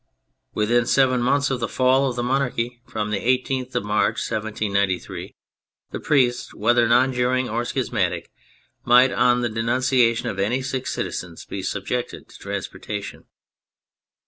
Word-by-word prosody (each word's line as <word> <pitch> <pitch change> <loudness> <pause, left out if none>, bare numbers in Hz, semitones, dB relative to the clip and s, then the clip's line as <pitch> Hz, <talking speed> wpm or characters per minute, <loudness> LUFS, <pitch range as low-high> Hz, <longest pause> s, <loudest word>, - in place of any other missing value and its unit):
Within 120 +3 +2
seven 130 -2 +3
months 140 +3 +2
of 130 - -1
the 115 - -1
fall 130 +3 +2
of 125 - -5
the 120 - -2
monarchy, 125 -2 -1
from 105 -3 -3
the 105 - 0
18th 130 +1 -1
of - - 0
March, 105 +1 +1
1793, 105 -4 -2 0.6
the - - -4
priests, 125 -4 +1
whether 120 +2 +3
non 125 +3 +4
juring 125 +1 +1
or 115 +2 -2
schismatic, 120 -6 -2 0.5
might, 125 +2 +5
on 125 0 +3
the 120 - +1
denunciation 115 +1 +1
of 95 - -4
any 120 +7 0
six 130 0 -3
citizens, 85 -2 -5
be 100 - -5
subjected 105 +6 -4
to - - -14
transportation. 105 -1 -6
120 Hz, 145 wpm, -23 LUFS, 110-130 Hz, 0.6 s, might